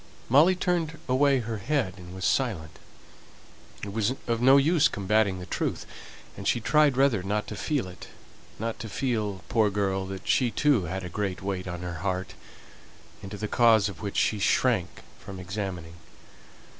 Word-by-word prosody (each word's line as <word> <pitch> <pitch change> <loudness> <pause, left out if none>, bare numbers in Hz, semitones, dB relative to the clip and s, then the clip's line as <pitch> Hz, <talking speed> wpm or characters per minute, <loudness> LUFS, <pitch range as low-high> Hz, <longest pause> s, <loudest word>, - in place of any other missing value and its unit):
Molly 155 +9 +6
turned 170 -3 -1
away 135 +1 +3
her 110 -1 -4
head, 125 -4 -1
and 90 0 -11
was 95 -1 -4
silent; 85 - -1 1.0
it 100 -1 -5
was 110 +4 0
of 115 -1 -1
no 135 +2 +7
use 155 +3 +4
combating 100 0 +1
the 90 - -7
truth, - - -3 0.5
and 100 - -6
she 120 - +2
tried 145 +2 +3
rather 135 -7 +3
not 105 +3 -2
to - - -7
feel 145 -10 -1
it 90 - -11 0.5
not 115 +1 -4
to 110 - -6
feel, 105 -6 -2
poor 110 -2 +2
girl, 95 -1 -1
that 95 0 -7
she 125 -3 +3
too 120 -3 +2
had 95 +3 -4
a - - -4
great 90 0 -3
weight 95 -2 -3
on 90 -1 -5
her 85 -2 -5
heart, 95 -2 -3 0.9
into 100 +1 -7
the 105 - -3
cause 110 -3 +4
of 90 -4 -10
which 100 - -4
she 105 - +2
shrank 110 -2 +1 0.2
from 95 -1 -9
examining. 95 -3 -5
105 Hz, 170 wpm, -27 LUFS, 95-125 Hz, 1.0 s, no